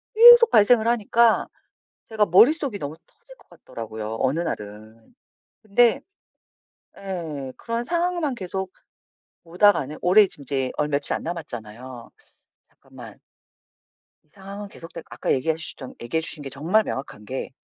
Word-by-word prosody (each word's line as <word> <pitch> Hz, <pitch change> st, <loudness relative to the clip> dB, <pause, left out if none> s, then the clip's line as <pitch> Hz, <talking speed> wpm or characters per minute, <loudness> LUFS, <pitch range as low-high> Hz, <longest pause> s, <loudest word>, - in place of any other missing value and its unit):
계속 475 Hz, +1 st, +9 dB
발생을 220 Hz, +2 st, +4 dB
하니까 235 Hz, 0 st, +2 dB, 0.6 s
제가 215 Hz, -2 st, 0 dB
머릿속이 245 Hz, -, +4 dB
너무 145 Hz, -3 st, -6 dB
터질 -, -, -19 dB
것 -, -, -25 dB
같더라고요, 110 Hz, -1 st, -8 dB
어느 135 Hz, +5 st, 0 dB
날은. 110 Hz, -, -7 dB, 0.5 s
근데 225 Hz, +3 st, +3 dB, 1.0 s
예. 160 Hz, -9 st, -6 dB
그런 230 Hz, +1 st, -4 dB
상황만 340 Hz, -1 st, -1 dB
계속 190 Hz, -1 st, -5 dB, 0.7 s
오다가는 170 Hz, -4 st, +2 dB
올해 200 Hz, +4 st, +6 dB
지금 145 Hz, -, -7 dB
이제 135 Hz, -1 st, -2 dB
얼 150 Hz, -, -1 dB
며칠 145 Hz, -1 st, 0 dB
안 -, -, -4 dB
남았잖아요. 125 Hz, -7 st, -8 dB, 0.5 s
잠깐만. -, -, -15 dB, 1.1 s
상황은 200 Hz, +1 st, -9 dB
계속되고 165 Hz, -3 st, -11 dB
아까 -, -, -3 dB
얘기하셨던 155 Hz, -1 st, -4 dB
얘기해 120 Hz, +8 st, -2 dB
주신 155 Hz, -2 st, -5 dB
게 135 Hz, -, -6 dB
정말 165 Hz, +11 st, +1 dB
명확한 130 Hz, -, -7 dB
게 130 Hz, +5 st, -5 dB
170 Hz, 295 characters per minute, -23 LUFS, 135-220 Hz, 1.1 s, 계속